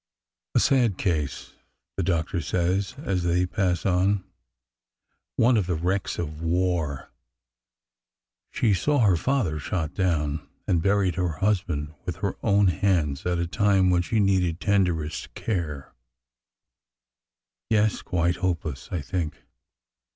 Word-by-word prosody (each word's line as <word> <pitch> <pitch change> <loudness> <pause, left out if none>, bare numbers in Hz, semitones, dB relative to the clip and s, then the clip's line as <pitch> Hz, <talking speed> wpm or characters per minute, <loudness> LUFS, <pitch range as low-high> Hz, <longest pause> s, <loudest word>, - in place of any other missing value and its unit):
A - - +6
sad 120 -8 +3
case! 75 -7 -2 0.2
'' - - -57
the - - -1
doctor 85 0 0
says 95 - -1
as 95 - 0
they 90 +1 +2
pass 90 -1 -1
on. 95 +1 +2 1.1
One 120 +1 +4
of 100 -4 0
the 90 - 0
wrecks 90 +4 -1
of 80 -2 -5
war! 85 -4 -1 1.4
She 110 -4 +1
saw 140 - +2
her 100 -5 +5
father 95 - 0
shot 80 +1 -3
down, 75 -6 -1 0.2
and 85 -3 +1
buried 100 -1 +2
her 90 -3 0
husband 85 -5 -1
with 90 -2 -4
her 100 +3 -2
own 100 -2 +4
hands 85 -5 0
at 90 -1 +1
a 85 - 0
time 95 +1 +3
when 90 -1 +3
she 110 +5 0
needed 95 -4 +2
tenderest 90 -6 0
care. 80 -10 -3 1.8
Yes, 110 -1 +2
quite 85 -1 0
hopeless, 80 -7 -3
I 90 -4 -2
think. 80 +1 -4
90 Hz, 130 wpm, -25 LUFS, 80-100 Hz, 1.8 s, A